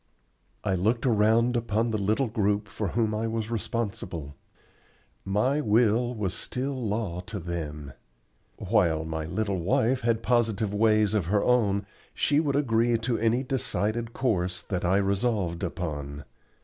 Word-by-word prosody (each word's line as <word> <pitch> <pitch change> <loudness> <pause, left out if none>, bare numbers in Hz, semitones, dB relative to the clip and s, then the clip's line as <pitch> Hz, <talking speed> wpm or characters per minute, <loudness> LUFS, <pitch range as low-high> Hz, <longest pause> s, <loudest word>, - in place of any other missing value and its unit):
I 100 -2 0
looked 110 +7 +1
around 115 +1 +3
upon 115 0 0
the 110 - 0
little 110 +7 +1
group 105 -2 0
for 105 +1 -3
whom 110 +3 0
I 110 +1 -1
was 115 0 -3
responsible. 100 -10 -3 0.9
My 125 +10 +1
will 120 +1 +2
was 100 -5 -2
still 130 +5 -2
law 110 -7 -2
to 105 -1 -4
them. 75 -5 -5 0.6
While 80 -2 +1
my 80 -1 -3
little 100 +2 -1
wife 110 +8 +1
had 115 -1 0
positive 110 -4 +1
ways 110 -1 +3
of 100 -6 0
her 100 +2 +2
own, 105 -5 +2 0.3
she 145 0 +2
would 145 -3 0
agree 120 -4 +2
to 115 +1 -1
any 115 +3 +2
decided 115 -3 -1
course 90 -8 -1
that 95 -3 -3
I 90 +2 +3
resolved 100 -3 0
upon. 75 -5 -4
110 Hz, 145 wpm, -27 LUFS, 95-115 Hz, 0.9 s, around